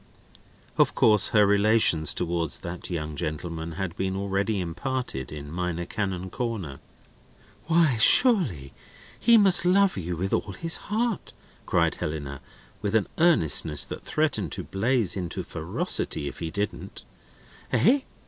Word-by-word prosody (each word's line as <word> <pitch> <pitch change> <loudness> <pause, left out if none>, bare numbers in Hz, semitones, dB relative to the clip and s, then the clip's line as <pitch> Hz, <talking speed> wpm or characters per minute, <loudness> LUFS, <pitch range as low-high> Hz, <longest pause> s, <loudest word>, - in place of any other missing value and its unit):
Of - - +3
course 105 -2 +4
her 105 -2 +4
relations 100 -6 +3
towards 85 -2 -1
that 85 0 -7
young 75 -3 -4
gentleman 80 +2 -5
had 90 -1 -5
been 95 0 -2
already 100 +2 -1
imparted 90 - -4
in 75 -1 -8
Minor 90 0 -3
Canon 95 -2 -4
Corner. 105 - -4 0.9
"Why, 160 -7 +2
surely 120 - +4 0.5
he 235 -1 +5
must 195 -5 +5
love 190 - +3
you 90 -2 -4
with 95 +3 -3
all 100 - -1
his 165 - 0
heart!" 220 -1 -2 0.3
cried - - +2
Helena, 70 -3 -5 0.4
with 105 +1 -2
an 110 - +1
earnestness 80 - +3
that - - -8
threatened 130 - -1
to - - -5
blaze 115 +1 0
into 90 -4 -4
ferocity 70 - -1
if - - -8
he 80 - -4
didn't. 100 +5 -5 0.7
"Eh? 260 +7 +4
95 Hz, 135 wpm, -25 LUFS, 85-125 Hz, 0.9 s, he